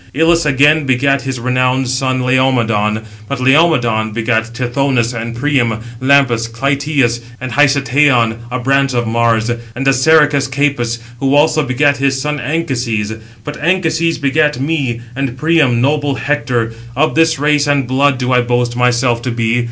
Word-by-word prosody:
Ilus 165 Hz, +1 st, +2 dB
again 145 Hz, +1 st, +3 dB
begat 135 Hz, +1 st, +1 dB
his 135 Hz, -2 st, -4 dB
renowned 125 Hz, +1 st, 0 dB
son 130 Hz, 0 st, -1 dB
Laomedon; 115 Hz, -5 st, +1 dB, 0.2 s
but 140 Hz, +2 st, -4 dB
Laomedon 125 Hz, -6 st, +2 dB
begat 115 Hz, 0 st, 0 dB
Tithonus 125 Hz, 0 st, -1 dB
and 115 Hz, 0 st, -5 dB
Priam, 120 Hz, -4 st, 0 dB, 0.2 s
Lampus, 130 Hz, -4 st, +2 dB
Clytius, 135 Hz, -1 st, -1 dB, 0.2 s
and 130 Hz, -1 st, -6 dB
Hicetaon, 135 Hz, -4 st, +2 dB
a 125 Hz, -, -3 dB
branch 135 Hz, +1 st, 0 dB
of 120 Hz, -1 st, 0 dB
Mars; 115 Hz, 0 st, 0 dB, 0.2 s
and 135 Hz, +3 st, -3 dB
Assaracus 140 Hz, 0 st, +3 dB
Capys, 130 Hz, -4 st, -1 dB, 0.2 s
who 135 Hz, +1 st, +1 dB
also 155 Hz, +1 st, +3 dB
begat 140 Hz, +1 st, +1 dB
his 135 Hz, 0 st, 0 dB
son 150 Hz, +2 st, -3 dB
Anchises. 120 Hz, -7 st, -2 dB, 0.3 s
But 145 Hz, +3 st, -7 dB
Anchises 165 Hz, -1 st, 0 dB
begat 150 Hz, 0 st, 0 dB
me, 135 Hz, -5 st, -2 dB
and 135 Hz, -2 st, -3 dB
Priam 150 Hz, -5 st, +2 dB
noble 145 Hz, +1 st, 0 dB
Hector. 120 Hz, -3 st, -2 dB, 0.2 s
Of 155 Hz, +1 st, +1 dB
this 160 Hz, +2 st, +2 dB
race 145 Hz, +1 st, +1 dB
and 140 Hz, -3 st, +1 dB
blood 135 Hz, +1 st, +1 dB
do 125 Hz, 0 st, -2 dB
I 125 Hz, -1 st, +3 dB
boast 120 Hz, 0 st, -1 dB
myself 125 Hz, -1 st, +1 dB
to 125 Hz, -, -4 dB
be. 115 Hz, 0 st, 0 dB
130 Hz, 150 wpm, -14 LUFS, 120-145 Hz, 0.3 s, again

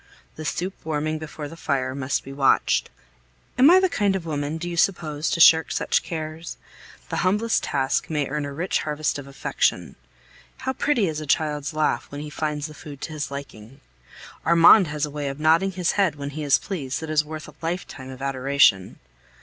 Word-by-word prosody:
The 155 Hz, -, -7 dB
soup 185 Hz, +5 st, -2 dB
warming 155 Hz, 0 st, -2 dB
before 155 Hz, -1 st, -7 dB
the 165 Hz, -, -10 dB
fire 135 Hz, -5 st, -1 dB
must 135 Hz, 0 st, -2 dB
be 135 Hz, -, -9 dB
watched. 135 Hz, -1 st, +2 dB, 0.7 s
Am 265 Hz, +4 st, +6 dB
I 365 Hz, +2 st, +8 dB
the 375 Hz, -, +3 dB
kind 205 Hz, -, +1 dB
of 180 Hz, -3 st, -4 dB
woman, 150 Hz, 0 st, -3 dB
do 175 Hz, -, -5 dB
you 175 Hz, -, -4 dB
suppose, 160 Hz, -4 st, 0 dB
to -, -, -1 dB
shirk 160 Hz, 0 st, +7 dB
such -, -, +1 dB
cares? 160 Hz, 0 st, -6 dB, 0.5 s
The -, -, -2 dB
humblest 210 Hz, +5 st, +1 dB
task 135 Hz, -2 st, -1 dB
may 150 Hz, -3 st, 0 dB
earn 150 Hz, +2 st, -3 dB
a 140 Hz, -, -5 dB
rich 170 Hz, +7 st, -1 dB
harvest 150 Hz, -1 st, -2 dB
of 140 Hz, -, -9 dB
affection. 140 Hz, -, -1 dB, 0.6 s
How 260 Hz, -, -3 dB
pretty 260 Hz, -6 st, +1 dB
is 155 Hz, -1 st, -3 dB
a 155 Hz, -, -7 dB
child's 150 Hz, 0 st, 0 dB
laugh 155 Hz, -, 0 dB
when 145 Hz, 0 st, -7 dB
he 150 Hz, 0 st, -7 dB
finds 150 Hz, -1 st, -3 dB
the 155 Hz, -, -7 dB
food 145 Hz, -1 st, -11 dB
to 160 Hz, -, -5 dB
his 150 Hz, -2 st, -4 dB
liking! 135 Hz, -3 st, -9 dB, 0.6 s
Armand 170 Hz, +3 st, +7 dB
has 150 Hz, 0 st, -2 dB
a 150 Hz, -, -8 dB
way 145 Hz, -1 st, -4 dB
of 135 Hz, +1 st, -5 dB
nodding 165 Hz, +5 st, +3 dB
his 180 Hz, -1 st, 0 dB
head 190 Hz, -7 st, +1 dB
when 140 Hz, -1 st, -6 dB
he 155 Hz, +2 st, -6 dB
is 140 Hz, -2 st, +4 dB
pleased 145 Hz, -10 st, -4 dB
that 160 Hz, -, -6 dB
is 155 Hz, -1 st, +3 dB
worth 155 Hz, 0 st, -8 dB
a 150 Hz, -, -13 dB
lifetime 165 Hz, -6 st, -5 dB
of 130 Hz, 0 st, -8 dB
adoration. 135 Hz, -7 st, +2 dB
155 Hz, 200 wpm, -24 LUFS, 140-165 Hz, 0.7 s, I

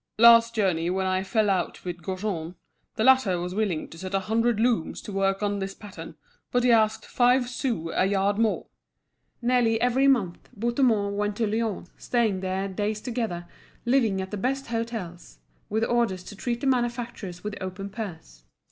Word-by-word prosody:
Last 230 Hz, 0 st, +7 dB
journey 180 Hz, -6 st, +1 dB
when 190 Hz, +1 st, 0 dB
I 185 Hz, 0 st, +1 dB
fell 215 Hz, +2 st, +1 dB
out 185 Hz, -3 st, -1 dB
with 175 Hz, -1 st, -5 dB
Gaujean, 185 Hz, -2 st, -4 dB, 0.4 s
the 220 Hz, -, 0 dB
latter 260 Hz, -8 st, +4 dB
was 180 Hz, +1 st, -4 dB
willing 200 Hz, -6 st, -1 dB
to 165 Hz, -, -12 dB
set 190 Hz, +1 st, -4 dB
a 195 Hz, -, +1 dB
hundred 225 Hz, +3 st, +1 dB
looms 225 Hz, -8 st, +1 dB
to -, -, -7 dB
work 195 Hz, +1 st, 0 dB
on 205 Hz, -1 st, 0 dB
this 195 Hz, 0 st, -4 dB
pattern, 165 Hz, -6 st, -10 dB, 0.4 s
but 245 Hz, 0 st, +2 dB
he 250 Hz, -, +5 dB
asked 220 Hz, -1 st, +3 dB
five 245 Hz, 0 st, +3 dB
sous 245 Hz, -, -2 dB
a 185 Hz, -, +3 dB
yard 200 Hz, +1 st, +1 dB
more." 225 Hz, -2 st, +1 dB, 0.8 s
Nearly 235 Hz, -2 st, +3 dB
even 260 Hz, +3 st, +4 dB
month 195 Hz, -10 st, -1 dB
Bouthemont 225 Hz, -3 st, +1 dB
went 205 Hz, 0 st, -1 dB
to 225 Hz, -, 0 dB
Lyons, 215 Hz, -4 st, -2 dB
staying 225 Hz, -6 st, +1 dB
there 190 Hz, +1 st, -2 dB
days 205 Hz, +2 st, -2 dB
together, 225 Hz, -8 st, -3 dB, 0.4 s
living 240 Hz, -6 st, +2 dB
at 190 Hz, -, -9 dB
the 210 Hz, -, -3 dB
best 270 Hz, +6 st, -1 dB
hôtels, 225 Hz, -7 st, -5 dB, 0.3 s
with 220 Hz, +2 st, 0 dB
orders 230 Hz, -7 st, 0 dB
to 205 Hz, -, -10 dB
treat 235 Hz, +3 st, -3 dB
the -, -, -3 dB
manufacturers 240 Hz, -8 st, -2 dB
with 210 Hz, 0 st, -4 dB
open 190 Hz, +1 st, -5 dB
purse. 160 Hz, -, -8 dB
210 Hz, 175 wpm, -26 LUFS, 185-235 Hz, 0.8 s, Last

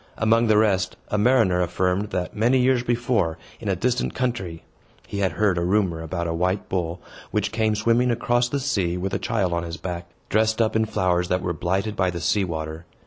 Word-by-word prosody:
Among 115 Hz, +2 st, +3 dB
the 110 Hz, -1 st, +4 dB
rest, 100 Hz, -4 st, +2 dB
a 105 Hz, -, 0 dB
mariner 105 Hz, -6 st, +3 dB
affirmed, 90 Hz, +3 st, 0 dB
that, 90 Hz, -1 st, -3 dB
many 120 Hz, +5 st, +3 dB
years 130 Hz, -1 st, +3 dB
before, 120 Hz, -8 st, 0 dB, 0.2 s
in 110 Hz, -, -4 dB
a 95 Hz, -, +2 dB
distant 120 Hz, +6 st, -1 dB
country, 105 Hz, -10 st, -2 dB, 0.4 s
he 100 Hz, -, -5 dB
had 95 Hz, -2 st, +1 dB
heard 100 Hz, -4 st, +2 dB
a -, -, 0 dB
rumor 90 Hz, -3 st, +1 dB
about 85 Hz, +1 st, -3 dB
a 85 Hz, -, -1 dB
white 90 Hz, +4 st, -1 dB
bull, 90 Hz, -2 st, -2 dB, 0.3 s
which -, -, -1 dB
came 110 Hz, -1 st, +1 dB
swimming 115 Hz, +3 st, +2 dB
across 120 Hz, +1 st, +1 dB
the 140 Hz, -, -1 dB
sea 100 Hz, -11 st, 0 dB
with 95 Hz, +2 st, -3 dB
a -, -, 0 dB
child 100 Hz, -7 st, 0 dB
on 85 Hz, -, 0 dB
his 85 Hz, -1 st, -6 dB
back, 85 Hz, 0 st, -5 dB, 0.2 s
dressed 110 Hz, +1 st, +2 dB
up 110 Hz, -1 st, +2 dB
in 110 Hz, 0 st, +3 dB
flowers 90 Hz, -4 st, 0 dB
that 90 Hz, 0 st, 0 dB
were 90 Hz, -, -1 dB
blighted 95 Hz, +6 st, -1 dB
by 95 Hz, -2 st, +1 dB
the 85 Hz, -1 st, -4 dB
sea 100 Hz, +5 st, +1 dB
water. 80 Hz, -1 st, -5 dB
95 Hz, 210 wpm, -24 LUFS, 90-115 Hz, 0.4 s, the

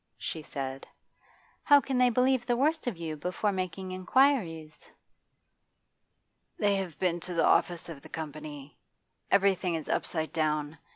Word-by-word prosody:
she 160 Hz, -, -5 dB
said. 135 Hz, -2 st, -6 dB, 0.7 s
'How 285 Hz, -1 st, +7 dB
can 270 Hz, -2 st, -2 dB
they 250 Hz, 0 st, +5 dB
believe 255 Hz, +1 st, +2 dB
the 240 Hz, -1 st, +2 dB
worst 305 Hz, +2 st, +1 dB
of 225 Hz, -8 st, -2 dB
you 160 Hz, -2 st, -4 dB
before 180 Hz, +7 st, -1 dB
making 185 Hz, 0 st, -4 dB
inquiries?' 185 Hz, -, +1 dB, 1.7 s
'They 205 Hz, -2 st, +2 dB
have 185 Hz, -5 st, -4 dB
been 175 Hz, -2 st, 0 dB
to 175 Hz, +1 st, -6 dB
the 165 Hz, -, +3 dB
office 175 Hz, -2 st, +2 dB
of 160 Hz, -5 st, -8 dB
the -, -, -13 dB
Company. 150 Hz, -2 st, -8 dB, 0.5 s
Everything 190 Hz, -3 st, +3 dB
is 160 Hz, -, -5 dB
upside 160 Hz, -1 st, -1 dB
down. 155 Hz, -1 st, -1 dB
175 Hz, 140 wpm, -29 LUFS, 155-210 Hz, 1.7 s, How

